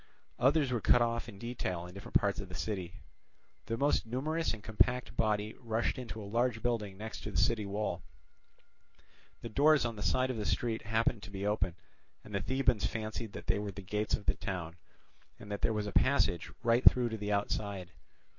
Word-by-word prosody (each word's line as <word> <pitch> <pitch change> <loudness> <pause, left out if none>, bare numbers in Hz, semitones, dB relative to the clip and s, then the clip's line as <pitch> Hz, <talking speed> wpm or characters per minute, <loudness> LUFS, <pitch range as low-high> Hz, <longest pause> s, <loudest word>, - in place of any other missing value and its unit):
Others 140 +2 +4
were 120 -3 0
cut 120 +3 +5
off 115 0 -1
in 100 - -10
detail 95 -6 -3
in 90 - -10
different 100 +1 -10
parts 100 -1 0
of 100 -2 -6
the 90 - -7
city. 95 -1 -4 0.6
The 115 - -1
most 140 -3 +2
numerous 155 +8 0
and 110 -2 -6
compact 120 +3 +1
body 105 0 +1
rushed 115 +1 -1
into 115 -3 -6
a 105 - -6
large 115 +2 0
building 105 -5 -1
next 110 +2 -6
to - - -5
the 95 - -3
city 105 +3 +2
wall: 100 -3 -2 1.4
the 115 - -4
doors 145 +3 +5
on 115 -2 -3
the - - -6
side 130 +8 +2
of 125 - -4
the 105 - -3
street 115 -2 0
happened 110 0 +1
to - - -9
be 100 0 -4
open, 105 -4 0 0.5
and 105 - -12
the 100 - 0
Thebans 125 -1 +1
fancied 110 -1 -4
that - - -7
they - - +1
were 105 0 -3
the 100 +1 -9
gates 105 +2 0
of 105 - -9
the - - +3
town, 85 -4 -5 0.6
and 105 - -10
that 100 - -3
there - - +2
was 105 -1 -1
a 105 - -3
passage 110 - +2
right 120 +1 +3
through 125 -2 +7
to 110 - -4
the 105 0 -3
outside. 100 -2 -1
110 Hz, 205 wpm, -33 LUFS, 100-120 Hz, 1.4 s, through